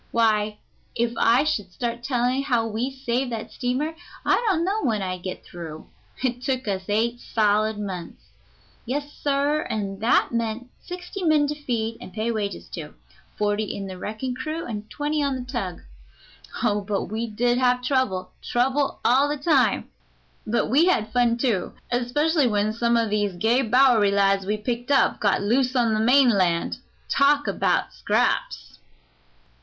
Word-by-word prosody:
Why, 215 -2 +2 0.4
if 235 0 0
I 235 +5 +4
should 210 -12 -2
start 235 +4 -3
telling 250 +1 0
how 245 -5 +1
we 225 +4 -2
saved 260 -1 -2
that 220 - -5
steamer 260 +6 -2 0.3
I - - +3
don't 340 -3 +1
know 410 +3 0
when 220 -6 0
I'd 185 -1 -4
get 185 0 -6
through. 165 -3 -9 0.3
It 245 -1 -1
took 255 -2 -2
us 190 -2 -2
eight 230 +3 0
solid 215 -1 +1
months. 190 -5 -6 0.6
Yes, 285 +4 -3
sir, 285 +1 0
and 195 -2 -3
that 230 - +3
meant 230 +1 -3
sixty 360 +2 -7
men 310 -3 +4
to - - 0
feed 230 -2 -2
and - - -9
pay 220 +3 -2
wages 210 -3 -3
to - - -8 0.4
forty 210 +1 0
in 200 -1 -5
the 190 -1 -6
wrecking 220 +6 -4
crew 310 +6 -4
and 215 -2 -6
twenty 295 +1 -1
on 280 -2 0
the 255 - -4
tug. 230 -9 -4 0.8
Oh, 205 0 +2
but 200 0 -2
we 225 +3 -3
did 240 +3 +1
have 250 -1 +2
trouble 255 -9 0
trouble 270 +3 0
all 265 +4 +4
the 295 - -1
time, 285 -2 +2 0.6
but 235 +2 +1
we 285 +8 +4
had 220 -12 +1
fun, 240 -1 +3
too, 235 -8 0 0.2
especially 285 +5 +2
when 210 -1 +1
some 235 +1 +2
o' 230 -1 +2
these 205 -2 0
gay 225 +8 +2
Bowery 240 -3 +4
lads 195 -1 +2
we'd 210 +1 -2
picked 245 0 -2
up 280 - +3
got 205 -1 +2
loose 250 +5 +1
on 235 -3 +3
the 215 - +1
mainland. 220 -8 +3 0.3
Talk 285 -1 +3
about 200 - 0
scraps!" - - -1
235 Hz, 165 wpm, -24 LUFS, 210-265 Hz, 0.8 s, I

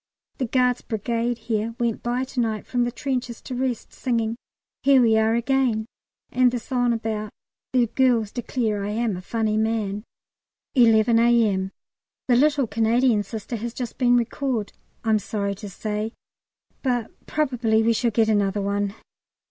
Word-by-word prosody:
The 255 - 0
Guards' 250 0 +2
Brigade 235 +2 -2
here 225 0 -2
went 235 -2 0
by 245 +2 -1
to 265 0 -5
night 220 -3 -1
from 245 -1 0
the 240 - -2
trenches 250 -2 -3
to 260 - -6
rest, 250 -1 -2
singing 230 -3 -1 0.5
"Here 275 -1 +5
we 230 -3 +4
are 220 +1 +3
again," 240 -2 +1 0.5
and 250 0 +4
the 245 - -1
song 245 0 0
about 220 -2 -2 0.4
"The 250 -2 +3
girls 235 -3 +2
declare 225 -4 -2
I 200 - -2
am 220 -1 0
a 180 - -6
funny 215 +2 -1
man!" 215 -2 -1 0.7
11 230 -2 +5
A.M. 220 -5 +3 0.6
The 245 - +4
little 285 +1 +3
Canadian 225 +1 +2
Sister 220 +3 -5
has 230 +2 -5
just 245 -3 -5
been 245 -1 +5
recalled, 240 -2 -1 0.3
I'm 220 -2 +3
sorry 200 -1 -2
to 200 +1 -8
say, 210 +3 -3 0.7
but 245 -4 -1 0.2
probably 245 -7 +1
we 230 +1 +3
shall 235 +1 +1
get 225 0 +2
another 205 -1 +1
one. 200 0 -1
230 Hz, 155 wpm, -24 LUFS, 215-245 Hz, 0.7 s, Here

